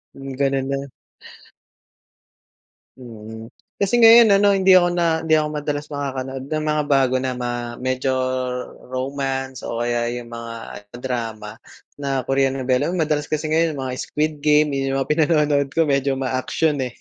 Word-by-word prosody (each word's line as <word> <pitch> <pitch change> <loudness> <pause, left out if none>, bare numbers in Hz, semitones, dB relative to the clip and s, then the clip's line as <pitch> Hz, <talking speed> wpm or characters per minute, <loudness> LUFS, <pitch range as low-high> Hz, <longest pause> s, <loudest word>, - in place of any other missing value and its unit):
Mm, 135 -1 -8
gano'n 135 -1 +1
na. 140 0 -3 2.1
Mm. 110 -2 -10 0.2
Kasi 205 +4 +1
ngayon 230 -2 +8
ano, 205 - +5
hindi 190 0 +5
ako 175 -1 +6
na 170 -2 +1
hindi 160 -1 +3
ako 150 0 0
madalas 145 0 -3
makakanood 135 -2 -4
ng 155 0 -1
mga 150 -1 +1
bago 135 -2 +3
na 130 - -1
ma 120 -1 -2 0.3
medyo 130 +1 -2 0.8
romance 135 0 -3
o 115 - -5
kaya 120 0 0
yung 120 -1 -9
mga 115 0 -7 0.4
drama 115 -4 -5 0.4
na 135 -2 -2
Korean 135 0 +1
novela, 130 +3 0
hmm, 180 - -2
madalas 150 -2 -1
kasi 155 0 -2
ngayon, 160 -2 +1
yung - - -4
mga 130 - -3
Squid 155 +1 -1
Game, 150 0 +3
yung 135 0 -1
mga 135 - -2
pinanonood 150 -3 +2
ko 165 - +4
medyo 140 -1 +1
ma-action, 135 +3 -1
eh. 125 -2 -4
135 Hz, 155 wpm, -21 LUFS, 130-155 Hz, 2.1 s, ngayon